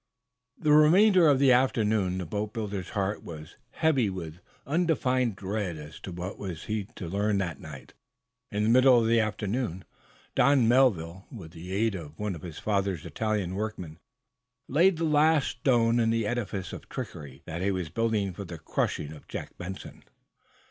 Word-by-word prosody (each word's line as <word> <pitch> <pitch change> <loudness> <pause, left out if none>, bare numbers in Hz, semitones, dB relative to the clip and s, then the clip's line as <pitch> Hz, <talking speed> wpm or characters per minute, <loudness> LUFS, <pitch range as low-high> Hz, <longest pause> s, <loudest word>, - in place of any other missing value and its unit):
The 155 -2 +1
remainder 175 +4 +6
of 145 -2 +5
the 135 -1 +5
afternoon 110 -7 +2
the 90 - -3
boatbuilder's 105 0 -4
heart 100 +1 -1
was, 80 -2 -9
somehow, - - -21
heavy 140 -9 +3
with 85 -3 -7 0.3
undefined 130 - +1
dread 95 -2 -3
as 75 0 -10
to 95 - -8
what 90 +3 -6
he - - -14
was 90 -5 -6 0.3
to 90 - -6
learn 100 +3 0
that 85 -7 -2
night. 75 -4 -11 0.6
In 105 0 -1
the 110 - +2
middle 130 +1 +6
of 115 - +1
the 115 +1 +3
afternoon, 110 -2 -2 0.5
Don 135 -3 +4
Melville, 100 -8 +2
with 95 - -9
the 85 +2 -9
aid 110 +3 +1
of 80 -4 -8
one 105 -2 -2
of 80 - -8
his 85 -3 -8
father's 100 -6 -1
Italian 105 -5 -2
workmen, 95 -6 -5 0.7
laid 170 +6 +4
the 165 - -2
last 155 -1 +3
stone 120 -2 +2
in 115 -1 +2
the 115 -1 +1
edifice 105 -5 -3
of - - -9
trickery 70 -2 -7
that 85 +2 -5
he 100 - +1
was 90 -4 -2
building 105 0 0
for 100 - -7
the 85 -3 -8
crushing 75 -1 -2
of 75 - -14
Jack - - -7
Benson. 95 +2 -8
105 Hz, 175 wpm, -28 LUFS, 90-125 Hz, 0.7 s, remainder